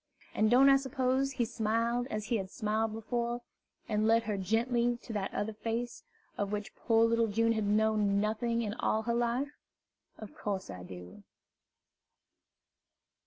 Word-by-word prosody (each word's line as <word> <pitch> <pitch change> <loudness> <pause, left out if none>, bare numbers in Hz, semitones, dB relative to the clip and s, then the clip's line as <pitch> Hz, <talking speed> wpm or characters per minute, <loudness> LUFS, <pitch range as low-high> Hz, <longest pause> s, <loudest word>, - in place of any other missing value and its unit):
And 215 0 +2
don't 255 +4 +6
I 275 0 +7
suppose 265 0 0
he 240 - 0
smiled 230 +2 0
as 215 0 -3
he 235 0 0
had 190 -2 -4
smiled 215 +2 -1
before, 235 +2 -3 0.4
and 215 0 +1
led 225 0 +4
her 215 -2 -2
gently 235 +5 +1
to 230 - -7
that 200 -2 -2
other 220 +1 -2
Face, 230 +3 -3 0.4
of 205 -1 -1
which 210 +2 -4
poor 225 -1 +3
little 230 0 +2
June 230 +2 +2
had 220 -2 0
known 210 -1 +2
nothing 230 +3 0
in 210 -2 -2
all 220 0 0
her 235 +1 0
life? 240 +4 0 0.7
Of 215 - -10
course 195 - -3
I 90 -2 -8
do. 90 0 -10
225 Hz, 160 wpm, -31 LUFS, 210-235 Hz, 0.7 s, I